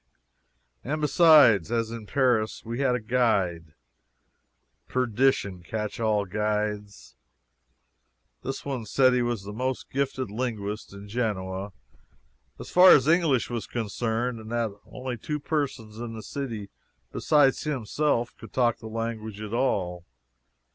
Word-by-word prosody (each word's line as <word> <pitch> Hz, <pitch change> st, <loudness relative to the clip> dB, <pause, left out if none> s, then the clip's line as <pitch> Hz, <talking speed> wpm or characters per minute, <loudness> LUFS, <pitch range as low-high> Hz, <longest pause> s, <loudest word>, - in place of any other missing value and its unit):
And 150 Hz, +4 st, -2 dB
besides, 150 Hz, -, +6 dB
as 115 Hz, -1 st, 0 dB
in 115 Hz, -2 st, -7 dB
Paris, 120 Hz, -4 st, +1 dB
we 115 Hz, +2 st, -4 dB
had 130 Hz, -3 st, +2 dB
a -, -, -1 dB
guide. 100 Hz, -10 st, 0 dB, 1.1 s
Perdition 125 Hz, -6 st, +1 dB
catch 105 Hz, +5 st, -4 dB
all 110 Hz, -2 st, +2 dB
the 90 Hz, -, -18 dB
guides. 105 Hz, -1 st, -2 dB, 1.3 s
This 135 Hz, +1 st, -5 dB
one 130 Hz, -6 st, -4 dB
said 130 Hz, +3 st, +4 dB
he 125 Hz, -, +2 dB
was 120 Hz, -4 st, -1 dB
the 105 Hz, +1 st, -7 dB
most 130 Hz, +3 st, -3 dB
gifted 130 Hz, -4 st, -2 dB
linguist 105 Hz, -3 st, -4 dB
in 100 Hz, +1 st, -10 dB
Genoa, 100 Hz, -3 st, -3 dB, 0.9 s
as -, -, -9 dB
far 180 Hz, +1 st, +8 dB
as 135 Hz, 0 st, +4 dB
English 160 Hz, -8 st, +3 dB
was 120 Hz, -2 st, -3 dB
concerned, 115 Hz, +1 st, -2 dB
and 110 Hz, +1 st, -10 dB
that 115 Hz, -2 st, 0 dB, 0.2 s
only 125 Hz, -1 st, -5 dB
two 150 Hz, +7 st, -4 dB
persons 130 Hz, -8 st, -3 dB
in 120 Hz, -1 st, -5 dB
the 110 Hz, -, -8 dB
city 115 Hz, -8 st, -5 dB, 0.4 s
beside 145 Hz, -3 st, +3 dB
himself 130 Hz, -2 st, -1 dB
could 115 Hz, -, -12 dB
talk 120 Hz, -3 st, +2 dB
the 110 Hz, -, -9 dB
language 110 Hz, -2 st, -4 dB
at 105 Hz, 0 st, -6 dB
all. 90 Hz, -8 st, 0 dB
115 Hz, 135 wpm, -26 LUFS, 105-130 Hz, 1.3 s, far